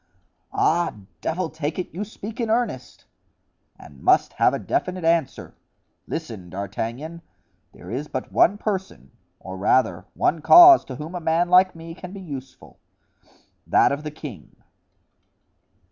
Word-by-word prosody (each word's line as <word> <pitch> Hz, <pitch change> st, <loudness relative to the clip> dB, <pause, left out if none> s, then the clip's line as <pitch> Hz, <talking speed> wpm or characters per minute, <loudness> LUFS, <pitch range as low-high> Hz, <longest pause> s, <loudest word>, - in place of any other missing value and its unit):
"Ah, 170 Hz, +2 st, +1 dB, 0.3 s
devil 175 Hz, +2 st, -2 dB
take 155 Hz, -1 st, -4 dB
it, 185 Hz, -, -5 dB
you 190 Hz, +5 st, -4 dB
speak 215 Hz, +2 st, -9 dB
in 230 Hz, -2 st, -1 dB
earnest——" 220 Hz, -, -2 dB, 0.7 s
"And 70 Hz, -2 st, -15 dB
must -, -, +3 dB
have -, -, +3 dB
a -, -, -2 dB
definite 185 Hz, -2 st, -2 dB
answer. 165 Hz, -4 st, 0 dB, 0.5 s
Listen, 110 Hz, -, -6 dB
D'Artagnan. 115 Hz, -, -5 dB, 0.5 s
There -, -, -12 dB
is 135 Hz, +5 st, -4 dB
but 130 Hz, -, -5 dB
one 200 Hz, +4 st, +4 dB
person, 190 Hz, -, -4 dB, 0.3 s
or 95 Hz, 0 st, -8 dB
rather, 105 Hz, +7 st, +1 dB
one 165 Hz, -, 0 dB
cause, 345 Hz, -, +9 dB
to 130 Hz, -, -7 dB
whom 150 Hz, +6 st, -8 dB
a 180 Hz, -, -4 dB
man 165 Hz, +1 st, +1 dB
like 185 Hz, 0 st, +5 dB
me 165 Hz, 0 st, -9 dB
can 180 Hz, +1 st, -10 dB
be 200 Hz, -, -8 dB
useful—that 135 Hz, -7 st, -4 dB
of 140 Hz, +1 st, -2 dB
the 150 Hz, -, -4 dB
king." 150 Hz, -7 st, -10 dB
165 Hz, 140 wpm, -23 LUFS, 130-185 Hz, 0.7 s, cause